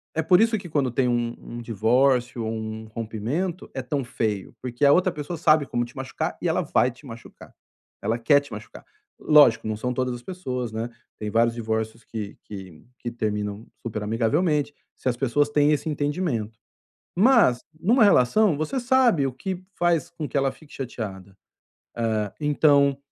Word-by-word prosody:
É 160 - +2
por 180 +4 +5
isso 225 0 +3
que 190 -3 -9
quando 140 -5 0
tem 125 +1 +1
um 120 -1 0
um 120 0 -8
divórcio 120 +2 +1
ou 110 - -2
um 110 0 -5
rompimento 115 - -3
é 135 - -3
tão 135 +2 -2
feio, 110 -5 -3
porque 125 +2 -1
a 140 - +7
outra 185 +4 +4
pessoa 150 +2 -5
sabe 155 -2 +4
como 120 -2 -1
te 120 - -15
machucar 130 -1 -4
e - - 0
ela - - +1
vai 125 - +2
te 125 +5 -18
machucar, 115 -2 -12 0.5
ela 115 - 0
quer 140 +5 +4
te 145 -2 -13
machucar. 105 0 -10 0.3
Lógico, 145 -8 +5
não 110 - -1
são 125 +4 -2
todas 130 0 -1
as 120 - -7
pessoas, 130 - -4
né, 110 +2 -3 0.3
tem 105 - -3
vários 115 +2 +3
divórcios 110 0 -3
que 105 -3 -7
que 95 -6 -10 0.2
que 120 - -4
terminam 105 -2 -3 0.2
super 105 -2 -4
amigavelmente, 145 - +1 0.2
se - - -2
as 120 - -2
pessoas 140 +3 +1
têm 145 0 +3
esse 150 +2 0
entendimento. 145 - -2 0.6
Mas, 215 - +5 0.2
numa 225 +7 +4
relação, 200 - +4
você 210 - -2
sabe 245 - +3
o 135 - -3
que 180 +8 -5
faz 175 -2 +1
com 155 -3 -5
que - - -5
ela 135 -1 +2
fique 155 - -18
chateada, 100 -7 -6 0.6
eh, 110 -3 -1
então 145 -2 +3
125 Hz, 180 wpm, -24 LUFS, 115-150 Hz, 0.6 s, a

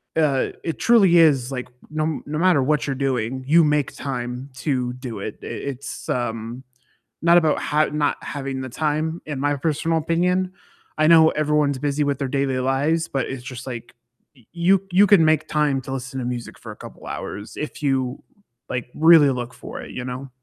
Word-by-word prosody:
uh, 150 -4 +2
it 165 - -3
truly 200 -7 +5
is, 140 -6 +4
like, 125 -1 -5 0.2
no 155 0 -1
m 155 -1 -2
no 150 - -3
matter 175 -3 +4
what 150 +2 +1
you're 135 - -1
doing, 130 -1 -1
you 165 +3 +6
make 150 -1 +1
time 125 0 -5
to 125 -2 -2
do 125 -4 -7
it, 105 +1 -6
i - - -7
it's, 140 0 -6
um, 120 +1 -3 0.6
not 170 +1 +6
about 160 -3 +3
ha 155 +1 +2
not 150 -1 0
having 135 -2 -4
the 130 - -5
time 155 +4 -1
in 150 -3 -4
my 145 +1 +1
personal 160 +3 0
opinion, 180 +3 +1 0.5
I 155 0 +3
know 160 -1 +7
everyone's 150 -3 +1
busy 145 +1 0
with 140 -1 -1
their 135 - -1
daily 135 -1 0
lives, 145 +6 +1
but 135 - -1
it's 130 -2 -6
just 125 0 -8
like 120 -2 -7 0.4
y 125 - -23
you 175 +2 +3
you 200 +3 +5
can 185 -5 +6
make 155 -1 +2
time 150 -3 +1
to 135 - -8
listen 135 0 -5
to 120 - -3
music 120 -1 -5
for - - -9
a - - -10
couple - - -12
hours 105 +1 -6
if 150 0 -6
you, 130 -2 0 0.5
like, 125 -2 -3
really 160 -3 +7
look 125 -1 -4
for - - -8
it, - - -9
you 125 0 -5
know? 130 +2 -6
140 Hz, 195 wpm, -22 LUFS, 130-155 Hz, 0.6 s, know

